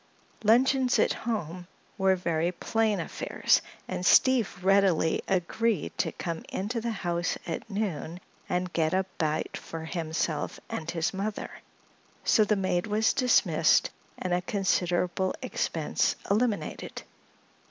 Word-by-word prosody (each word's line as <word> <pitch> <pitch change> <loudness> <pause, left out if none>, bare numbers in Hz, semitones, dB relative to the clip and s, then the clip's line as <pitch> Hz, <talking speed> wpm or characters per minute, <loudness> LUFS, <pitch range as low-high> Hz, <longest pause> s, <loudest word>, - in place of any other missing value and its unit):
Luncheons 250 +3 +4
at - - +3
home 180 -6 -4 0.3
were 190 -2 +3
very 170 -1 0
plain 215 +2 0
affairs 165 - +1 0.3
and - - -4
Steve 245 +3 +5
readily 195 -5 +3
agreed 195 +2 0
to - - +1
come 170 -2 -4
into 220 +5 -3
the 235 - -2
house 175 -5 -1
at 165 +5 -5
noon 180 -5 -3 0.3
and 180 0 -1
get 160 +1 +1
a 190 0 +1
bite 155 -2 -1
for 160 -1 -7
himself 160 -2 -2
and 165 +1 -4
his 165 0 -1
mother. 205 +2 -3 0.7
So 220 - +5
the 210 0 +2
maid 185 -1 0
was 215 +1 +2
dismissed 250 -2 +3 0.3
and 180 -1 -2
a 180 - +1
considerable 180 -1 0
expense - - 0 0.2
eliminated. 215 0 -1
190 Hz, 125 wpm, -28 LUFS, 170-215 Hz, 0.7 s, Steve